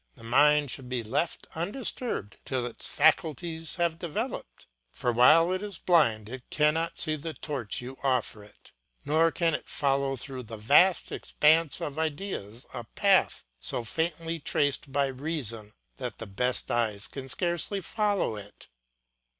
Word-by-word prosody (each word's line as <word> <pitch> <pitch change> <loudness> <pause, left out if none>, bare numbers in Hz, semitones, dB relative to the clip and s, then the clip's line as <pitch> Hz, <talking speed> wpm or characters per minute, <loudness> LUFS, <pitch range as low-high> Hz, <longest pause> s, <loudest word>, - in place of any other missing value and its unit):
The 120 - -15
mind 145 +4 +4
should 130 -3 -6
be 125 -2 -1
left 135 +9 -1
undisturbed 200 - -3
till 130 -2 -2
its 120 - -4
faculties 160 0 +1
have 170 -2 0
developed; 210 - -5 0.3
for 120 - -1
while 155 +9 +6
it 185 +1 -1
is 205 -4 -4
blind 115 - +3
it 125 +2 -9
cannot 155 +3 +1
see 155 -2 +1
the 155 +2 -6
torch 130 -9 -3
you 130 +2 -8
offer 125 -5 0
it, 105 - -18 0.3
nor 160 +3 +3
can 165 -1 +1
it - - -3
follow 135 -1 0
through 130 0 -4
the 115 -2 -8
vast 150 - +4
expanse 155 0 +2
of 145 +1 -4
ideas 145 - -3
a - - -5
path - - +2 0.2
so 120 - -3
faintly 165 +5 -2
traced 145 -1 0
by 140 0 +2
reason 130 -6 -2 0.3
that 125 -3 -5
the 115 - -6
best 125 +5 -1
eyes 110 -4 0
can 135 -1 -8
scarcely 175 +6 -1
follow 205 - 0
it. 105 0 -12
145 Hz, 150 wpm, -28 LUFS, 125-165 Hz, 0.3 s, while